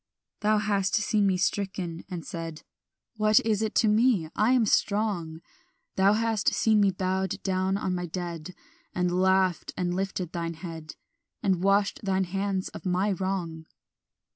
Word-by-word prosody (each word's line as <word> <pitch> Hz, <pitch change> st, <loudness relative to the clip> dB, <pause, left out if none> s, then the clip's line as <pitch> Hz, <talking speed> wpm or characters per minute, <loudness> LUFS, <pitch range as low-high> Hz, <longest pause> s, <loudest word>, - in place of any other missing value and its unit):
"Thou 215 Hz, 0 st, +2 dB
hast 200 Hz, -2 st, +1 dB
seen 210 Hz, -1 st, +2 dB
me 190 Hz, -1 st, +2 dB
stricken, 185 Hz, -3 st, -2 dB
and 175 Hz, -3 st, -6 dB
said, 165 Hz, -2 st, -6 dB, 0.5 s
What 215 Hz, 0 st, +5 dB
is 220 Hz, -2 st, 0 dB
it 220 Hz, -1 st, -2 dB
to 225 Hz, -, +4 dB
me? 210 Hz, -6 st, +3 dB
I 215 Hz, +4 st, +3 dB
am 245 Hz, -3 st, +4 dB
strong: 200 Hz, -7 st, 0 dB, 0.5 s
Thou 195 Hz, +2 st, +4 dB
hast 225 Hz, -2 st, +1 dB
seen 220 Hz, -1 st, +3 dB
me 200 Hz, -, +4 dB
bowed 190 Hz, 0 st, -1 dB
down 190 Hz, 0 st, 0 dB
on 190 Hz, -2 st, -2 dB
my 180 Hz, -1 st, -3 dB
dead 175 Hz, 0 st, -6 dB, 0.4 s
And 180 Hz, 0 st, +1 dB
laughed 190 Hz, -2 st, +2 dB
and 175 Hz, -1 st, -1 dB
lifted 185 Hz, -2 st, -3 dB
thine 170 Hz, -1 st, -3 dB
head, 160 Hz, -2 st, -8 dB, 0.5 s
And 190 Hz, -4 st, +1 dB
washed 200 Hz, +1 st, +2 dB
thine 190 Hz, -1 st, +1 dB
hands 195 Hz, +1 st, -2 dB
of -, -, -10 dB
my 185 Hz, +2 st, +1 dB
wrong. 175 Hz, -4 st, -3 dB
190 Hz, 155 wpm, -27 LUFS, 175-205 Hz, 0.5 s, What